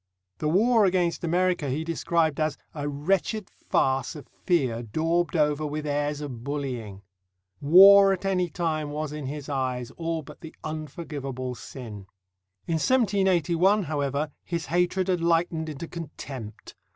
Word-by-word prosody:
The 150 - 0
war 220 +6 +4
against 180 -3 +1
America 175 -3 +1
he 145 +5 -1
described 165 -2 0
as 155 -1 0 0.2
"a 145 -1 -3
wretched 190 +7 -1
farce 130 0 0
of 150 - -9 0.2
fear 130 -10 +2
daubed 165 +9 0
over 150 -1 +2
with 150 0 -3
airs 145 0 -1
of 125 -6 -6
bullying." 125 -8 -4 0.6
War 195 +6 +8
at 190 0 -2
any 180 -2 +1
time 155 -2 -2
was, 150 0 -4
in 150 -3 -5
his 145 0 -6
eyes, 130 -4 -2
all 165 -1 -2
but - - -13
the 160 -1 -10
unforgivable 145 -5 -5
sin. 110 -5 -9 0.6
In 165 -1 0
1781, 195 - +3
however, 145 -1 -2
his 170 -2 -3
hatred 180 +2 +1
had 180 -2 +1
lightened 165 -1 +1
into 155 +2 -6
contempt. 135 - -8
155 Hz, 140 wpm, -26 LUFS, 140-175 Hz, 0.6 s, War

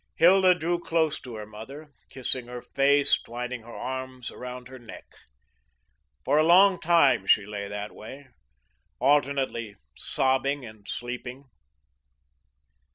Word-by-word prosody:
Hilda 185 +2 +6
drew 175 +1 -1
close 160 -3 0
to 125 -3 -9
her 105 -1 -7
mother, 135 +9 -11 0.2
kissing 130 -1 -3
her 125 0 -7
face, 140 +1 +2
twining 125 +1 -6
her 115 +1 -12
arms 130 -1 -6
around 125 0 -8
her 130 0 -11
neck. 115 -2 -11 1.2
For 145 +3 +3
a - - +5
long 185 +3 +6
time, 155 - +3
she 105 - +4
lay 100 -1 -5
that 105 +1 -6
way, 135 +5 -11 0.7
alternately 135 -5 +1 0.2
sobbing 135 +1 0
and 110 -2 -13
sleeping. 125 +3 -6
130 Hz, 125 wpm, -26 LUFS, 120-145 Hz, 1.2 s, Hilda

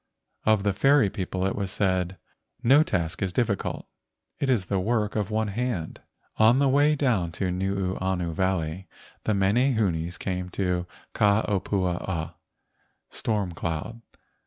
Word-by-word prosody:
Of 110 -2 +4
the 100 -1 +1
fairy 135 0 +4
people 95 0 -3
it 95 - 0
was 100 -2 -2
said: 95 -1 0 0.5
"No 135 +5 +6
task 90 - -1
is 95 -2 0
difficult. 105 -1 -1 0.5
It 140 -3 0
is 115 -8 +2
the 95 0 0
work 105 +1 0
of 105 -2 -1
one 110 0 0
hand." 105 -6 -3 0.4
On 110 +3 +6
the 140 0 +3
way 145 +3 +4
down 120 - +1
Nuuanu 95 -2 -1
Valley 95 0 -1 0.4
the 110 - +2
mene¬ 110 +7 +2
hunes 90 -5 -1
came 90 -1 -3
to 90 -2 0 0.3
Ka 105 0 +3
opua 95 -3 -1
ua 80 -3 -4 0.8
(storm 105 -5 -1
cloud). 85 +7 -4
95 Hz, 140 wpm, -26 LUFS, 90-110 Hz, 0.8 s, No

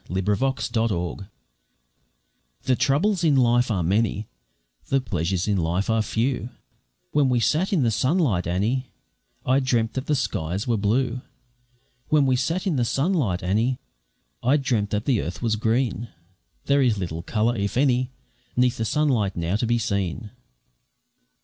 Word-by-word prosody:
Wormwood 95 +4 0
and 135 -1 -1
Nightshade 100 -3 -1 1.3
The 130 - +2
troubles 155 - +1
of 150 -4 +4
life 120 -1 +3
are 95 -6 0
many, 105 +3 0 0.6
The 135 - +2
pleasures 95 -5 -2
of 100 -2 +1
life 90 +6 0
are 110 0 +2
few; 120 +3 -1 0.6
When 145 -3 +3
we 125 -1 +2
sat 160 +10 +1
in 175 -9 +2
the 115 - +2
sunlight, 130 - +1
Annie, 110 +9 0 0.6
I 130 +2 +3
dreamt 120 -4 0
that 130 +1 -4
the 150 - +2
skies 100 - -2
were 120 - +2
blue 120 +4 0 0.9
When 150 -2 +3
we 130 -1 +3
sat 165 +9 -1
in 175 -7 0
the 125 - +2
sunlight, 135 - 0
Annie, 115 +8 +1 0.6
I 130 +5 +3
dreamt 115 -7 0
that 105 +1 -2
the 125 -6 +2
earth 85 +10 -6
was 115 -2 +1
green; 115 0 0 0.6
There 140 0 +3
is 120 -5 +2
little 85 -4 -4
colour, 110 +6 0
if 100 +1 -2
any, 130 -2 +2 0.5
'Neath 125 0 +3
the 115 - -1
sunlight 120 -8 +1
now 85 +2 -1
to 115 +2 0
be 120 +1 +2
seen. 100 -1 -2
115 Hz, 155 wpm, -24 LUFS, 100-130 Hz, 1.3 s, of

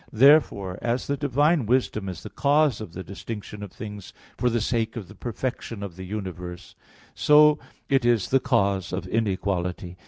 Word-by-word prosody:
Therefore, 110 -8 +4
as 120 +2 -1
the 140 - -1
divine 145 0 +2
wisdom 110 -5 +1
is 90 -2 -7
the - - -8
cause 145 -3 +2
of 90 -6 -8
the 95 - -6
distinction 105 +2 -7
of 100 -3 -7
things 105 -3 -8 0.2
for 125 - +1
the 120 0 0
sake 115 +1 -1
of 110 -6 -6
the 105 - -12
perfection 115 0 -5
of 95 -4 -7
the 95 +1 -8
universe, 90 -3 -6 0.4
so 150 0 +6 0.3
it 135 -2 +2
is 120 -4 +2
the 135 - +4
cause 100 -7 +1
of 95 - -3
inequality. 95 -4 -2
110 Hz, 175 wpm, -25 LUFS, 95-130 Hz, 0.4 s, so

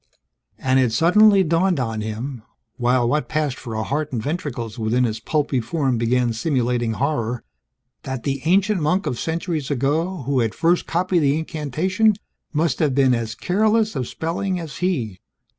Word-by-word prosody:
And 130 0 +2
it 125 -3 +2
suddenly 195 - +5
dawned 170 0 +2
on 115 -3 -2
him 115 +4 -5 0.4
(while 125 0 +2
what 150 +5 0
passed 150 -4 -1
for 115 -4 -6
a 110 - -1
heart 150 +5 -2
and 120 - -2
ventricles 125 -4 -4
within 115 +3 +1
his 110 -2 -1
pulpy 145 0 0
form 130 0 -1
began 120 0 +1
simulating 120 -2 0
horror) 125 -3 -1 0.6
that 130 -3 -5
the 140 -1 -2
ancient 190 +2 +3
monk 180 +6 +1
of 120 - -2
centuries 160 -3 -2
ago 150 +5 0
who 135 +1 0
had 115 -4 0
first 170 +1 +2
copied 180 +1 +1
the 145 -1 +2
incantation 165 - 0 0.4
must 160 +2 0
have 145 -5 +1
been 135 -2 +4
as 115 -1 -2
careless 215 - +1
of 130 -3 -2
spelling 180 +3 -2
as 155 -6 -7
he. 125 - -1
140 Hz, 165 wpm, -22 LUFS, 120-170 Hz, 0.6 s, suddenly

